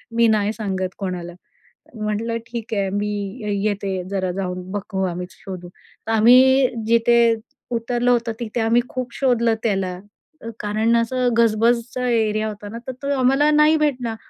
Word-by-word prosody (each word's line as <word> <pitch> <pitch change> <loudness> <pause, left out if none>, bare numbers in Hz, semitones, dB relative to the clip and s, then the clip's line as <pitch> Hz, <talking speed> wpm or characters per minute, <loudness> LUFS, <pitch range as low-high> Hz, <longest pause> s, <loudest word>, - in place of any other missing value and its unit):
मी 235 0 +4
नाही 215 -1 +2
सांगत 190 -4 -3
कोणाला." 180 -3 -5 0.6
म्हटलं, 215 +2 -2
"ठीक 230 -2 -5
आहे, 200 -2 0
मी 210 0 -2 0.3
ये 210 -1 -1 0.2
येते 195 -2 -3
जरा 190 -2 -1
जाऊन, 180 -1 -4
बघू 195 -1 -3
आम्ही 180 +1 -5
शोधू." 185 -3 -9
तर 215 +4 -11
आम्ही 255 +4 +6 0.2
जिथे 235 +1 +4 0.6
उतरलं 240 +1 0
होतं, 235 -1 +1
तिथे 235 0 -3
आम्ही 230 +2 +3
खूप 255 -2 -5
शोधलं 235 -4 +2
त्याला. 195 -4 -1 0.4
अ, 230 - -6
कारण 215 +3 +1
असं 245 +2 +1
गजबजचा 235 +2 +2
एरिया 220 -2 +1
होता 205 -1 -7
ना, 230 - -7
तर - - -2
तो 280 0 0
आम्हाला 270 +4 +3
नाही 300 +1 +5
भेटला. 255 -7 -1
225 Hz, 155 wpm, -21 LUFS, 200-240 Hz, 0.6 s, आम्ही